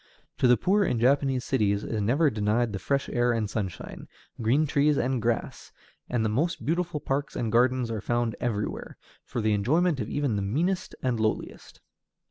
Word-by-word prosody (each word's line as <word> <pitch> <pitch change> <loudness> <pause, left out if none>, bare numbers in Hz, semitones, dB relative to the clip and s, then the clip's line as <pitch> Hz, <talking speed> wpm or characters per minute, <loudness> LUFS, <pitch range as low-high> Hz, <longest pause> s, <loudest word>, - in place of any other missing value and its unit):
To - - +4
the 125 0 +5
poor 200 - +2
in 120 - 0
Japanese 135 +1 +2
cities 105 -5 +1
is 110 -2 -2
never 140 +8 +2
denied 110 +2 0
the 95 - -3
fresh 140 +8 -1
air 120 -1 +2
and 110 -2 -1
sunshine, 100 -4 -5 0.3
green 130 +8 +3
trees 145 0 +2
and 130 -1 0
grass; 115 0 -2 0.4
and 120 -3 0
the 135 +11 +1
beautiful 170 -1 -1
parks 140 +1 -2
and 115 -2 -2
gardens 125 0 +2
are 110 -2 -3
found 120 -1 -1
everywhere, 105 -4 -3 0.3
for 120 - -4
the 110 0 +2
enjoyment 150 - +2
of 105 - -3
even 140 -7 -1
the - - -1
meanest 165 - -1
and 125 -3 0
lowest. 110 0 -3
120 Hz, 175 wpm, -27 LUFS, 110-140 Hz, 0.4 s, the